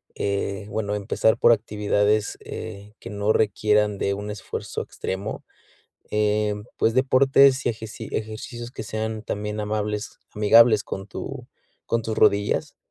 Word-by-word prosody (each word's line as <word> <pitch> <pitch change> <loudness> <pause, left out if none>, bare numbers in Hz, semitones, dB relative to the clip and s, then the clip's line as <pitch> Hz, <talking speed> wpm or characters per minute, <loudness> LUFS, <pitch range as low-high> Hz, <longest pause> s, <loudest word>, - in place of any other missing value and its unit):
eh, 100 0 -2
bueno, 105 -1 -2
empezar 105 +2 +1
por - - +6
actividades, 105 -1 0
eh, 105 -1 -8
que - - -9
no 105 +1 +1
requieran 105 -1 +2
de 100 - 0
un 105 +1 -5
esfuerzo 105 - -5
extremo. 95 +2 -5 0.7
Em, 105 -1 0
pues, 115 - +2
deportes, 135 +1 +5
y - - +5
ejeci 110 -1 -6
ejercicios 120 +2 -5
que - - -6
sean 110 0 -4
también 105 0 -4
amables, 105 0 -3 0.2
amigables 110 +1 +6
con 95 0 -6
tu - - -7 0.4
con 115 0 0
tus 110 0 -3
rodillas, 100 -1 +2
105 Hz, 135 wpm, -24 LUFS, 105-110 Hz, 0.7 s, por